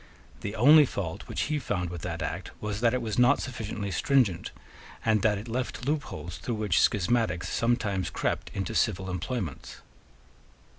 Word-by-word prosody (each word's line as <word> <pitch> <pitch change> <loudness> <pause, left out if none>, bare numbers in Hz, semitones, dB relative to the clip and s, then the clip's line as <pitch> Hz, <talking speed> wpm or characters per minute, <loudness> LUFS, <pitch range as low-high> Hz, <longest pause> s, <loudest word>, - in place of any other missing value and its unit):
The 100 +1 -5
only 145 +5 +7
fault 85 -8 -5
which - - -2
he 150 0 0
found 90 -9 -2
with 85 -2 -6
that 85 -2 -4
Act 80 +5 -4
was 105 0 -3
that 120 0 +3
it 125 - -1
was 110 0 -1
not 125 +3 +5
sufficiently 105 -5 -4
stringent, 105 - +2 0.6
and 110 -2 +3
that 105 -1 +3
it 105 +4 -7
left 125 +1 -3
loopholes 110 - -3
through 120 - -3
which 105 -6 +2
schismatics 105 -3 +1
sometimes 105 -6 0
crept - - -2
into 95 -3 -2
civil 95 -4 0
employments. 90 - -4
105 Hz, 160 wpm, -28 LUFS, 90-120 Hz, 0.6 s, only